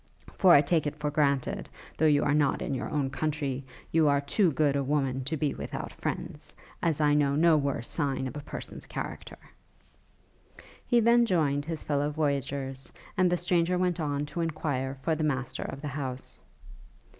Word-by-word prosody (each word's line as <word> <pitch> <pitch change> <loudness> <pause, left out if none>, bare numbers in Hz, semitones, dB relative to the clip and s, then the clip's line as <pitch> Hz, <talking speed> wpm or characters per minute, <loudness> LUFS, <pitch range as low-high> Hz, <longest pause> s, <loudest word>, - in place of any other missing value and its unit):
For 185 - +5
I 145 - +8
take 155 +1 +1
it 145 - -4
for 150 -1 -2
granted, 140 -3 0 0.3
though 160 - +3
you 145 -1 +4
are 145 - +2
not 145 -2 +2
in - - -2
your 130 - -3
own 140 -3 -1
country, 145 -4 -2 0.3
you 160 -1 +4
are 140 -1 +4
too 165 +6 +2
good 145 -1 +2
a 140 - +1
woman 135 -2 0
to 155 +3 -2
be 145 -1 0
without - - -5
friends, - - -5 0.3
as 160 -3 +1
I 150 -1 +4
know 145 -1 +3
no 165 +1 +5
worse 140 -5 -1
sign 140 -4 -1
of 130 - -5
a - - -4
person's 145 - -7
character.' - - -6 1.5
He 240 -2 +4
then 235 +1 +5
joined 145 -6 +1
his 160 -1 -4
fellow 145 0 0
voyagers, 140 -3 -2 0.2
and 185 -3 +3
the 180 - +2
stranger 175 0 +1
went 180 -1 0
on 145 -2 -1
to 170 +3 -4
enquire 140 -5 -2
for 165 - +1
the 155 0 -1
master 130 -3 -1
of 135 - -6
the 150 - -4
house. 130 -2 -5
145 Hz, 185 wpm, -28 LUFS, 140-160 Hz, 1.5 s, I